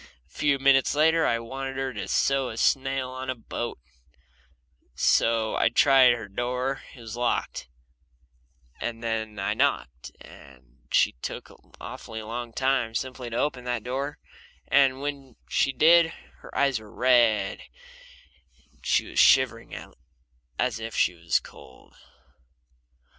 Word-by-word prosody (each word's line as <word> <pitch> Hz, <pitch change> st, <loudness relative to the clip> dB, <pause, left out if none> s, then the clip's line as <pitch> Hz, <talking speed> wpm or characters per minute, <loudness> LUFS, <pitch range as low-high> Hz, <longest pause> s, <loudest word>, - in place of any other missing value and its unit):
A -, -, -29 dB
few 145 Hz, -2 st, +1 dB
minutes 135 Hz, 0 st, +3 dB
later 160 Hz, +2 st, +3 dB
I 115 Hz, -, +2 dB
wanted 135 Hz, +3 st, -6 dB
her 135 Hz, -1 st, -2 dB
to -, -, -5 dB
sew 135 Hz, -2 st, +1 dB
a 110 Hz, -, -8 dB
sail 135 Hz, 0 st, 0 dB
on 130 Hz, 0 st, -6 dB
a 130 Hz, -, -1 dB
boat, 120 Hz, 0 st, -5 dB, 1.2 s
so 115 Hz, -1 st, +2 dB
I -, -, +3 dB
tried 130 Hz, +1 st, +6 dB
her 115 Hz, -3 st, -6 dB
door 125 Hz, +6 st, -3 dB
and -, -, -15 dB
it -, -, -12 dB
was 115 Hz, -1 st, -8 dB
locked, 120 Hz, -, -2 dB, 1.1 s
and 115 Hz, -1 st, -5 dB
then 110 Hz, -2 st, -3 dB
I 100 Hz, +1 st, -1 dB
knocked 105 Hz, -, -1 dB
and 65 Hz, -2 st, -17 dB
she -, -, +4 dB
took -, -, -6 dB
an -, -, -22 dB
awfully 110 Hz, -1 st, -8 dB
long 120 Hz, +2 st, -6 dB
time 130 Hz, -2 st, 0 dB
simply 130 Hz, 0 st, -4 dB
to 115 Hz, -, -4 dB
open 130 Hz, -3 st, -1 dB
that 120 Hz, -3 st, -2 dB
door, 135 Hz, +4 st, -4 dB, 0.5 s
and 135 Hz, -1 st, +3 dB
when 140 Hz, -2 st, -6 dB
she 135 Hz, -, +1 dB
did 165 Hz, +5 st, +5 dB, 0.3 s
her -, -, -10 dB
eyes 140 Hz, -4 st, +2 dB
were 110 Hz, -1 st, -14 dB
red 120 Hz, -6 st, +2 dB, 1.1 s
and -, -, -31 dB
she -, -, +2 dB
was -, -, -3 dB
shivering 125 Hz, -4 st, +4 dB, 0.8 s
as 120 Hz, -3 st, -1 dB
if 115 Hz, 0 st, -6 dB
she -, -, +2 dB
was 85 Hz, -1 st, 0 dB
cold. -, -, -16 dB
125 Hz, 145 wpm, -26 LUFS, 115-135 Hz, 1.2 s, tried